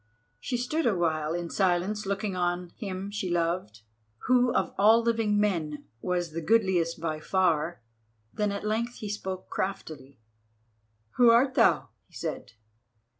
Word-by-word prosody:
She 245 Hz, -, -2 dB
stood 280 Hz, +6 st, 0 dB
awhile 165 Hz, -6 st, 0 dB
in 175 Hz, -1 st, -4 dB
silence 195 Hz, +2 st, 0 dB
looking 200 Hz, 0 st, -2 dB
on 175 Hz, 0 st, -1 dB
him 195 Hz, -2 st, -5 dB
she 205 Hz, -3 st, -3 dB
loved, 170 Hz, -, -1 dB, 0.4 s
who 250 Hz, -1 st, +4 dB
of -, -, 0 dB
all 220 Hz, +3 st, +5 dB
living 225 Hz, -3 st, +1 dB
men 160 Hz, -8 st, -1 dB, 0.2 s
was 175 Hz, -2 st, -1 dB
the 165 Hz, +2 st, -4 dB
goodliest 185 Hz, -5 st, +2 dB
by 155 Hz, -1 st, -3 dB
far. 165 Hz, -4 st, 0 dB, 0.5 s
Then 210 Hz, -1 st, 0 dB
at 200 Hz, +1 st, -4 dB
length 230 Hz, +3 st, -1 dB
he 210 Hz, -, -6 dB
spoke 190 Hz, -2 st, -5 dB
craftily: 150 Hz, -8 st, -4 dB, 1.0 s
"Who 245 Hz, -2 st, +7 dB
art 250 Hz, +3 st, +5 dB
thou?" -, -, +3 dB, 0.2 s
he -, -, -21 dB
said. -, -, -5 dB
190 Hz, 140 wpm, -28 LUFS, 170-215 Hz, 1.0 s, Who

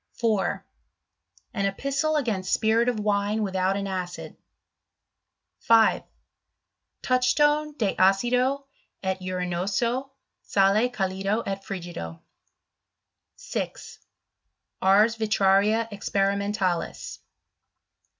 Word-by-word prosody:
4 220 Hz, -5 st, -1 dB, 0.9 s
An 200 Hz, -3 st, 0 dB
Epistle 275 Hz, +9 st, -1 dB
against 220 Hz, -10 st, -1 dB
Spirit 225 Hz, +2 st, +3 dB
of 235 Hz, -3 st, -2 dB
Wine 205 Hz, +1 st, 0 dB
without 190 Hz, 0 st, 0 dB
an 200 Hz, -, -3 dB
acid. 185 Hz, -2 st, -5 dB, 1.2 s
5. 225 Hz, -1 st, +4 dB, 1.0 s
Touchstone 295 Hz, +4 st, +2 dB
de 210 Hz, -5 st, 0 dB
Acido 250 Hz, +8 st, +2 dB, 0.4 s
et 190 Hz, 0 st, -2 dB
Urinoso, 185 Hz, +8 st, -2 dB, 0.3 s
Sale 200 Hz, +5 st, +2 dB
calido 195 Hz, -1 st, -1 dB
et 195 Hz, 0 st, -4 dB
frigido. 170 Hz, -, -7 dB, 1.2 s
6. -, -, -6 dB, 0.8 s
Ars 210 Hz, +4 st, +4 dB
Vitraria 210 Hz, +1 st, +2 dB
experimentalis. 200 Hz, -2 st, -1 dB
205 Hz, 80 wpm, -25 LUFS, 190-235 Hz, 1.2 s, 5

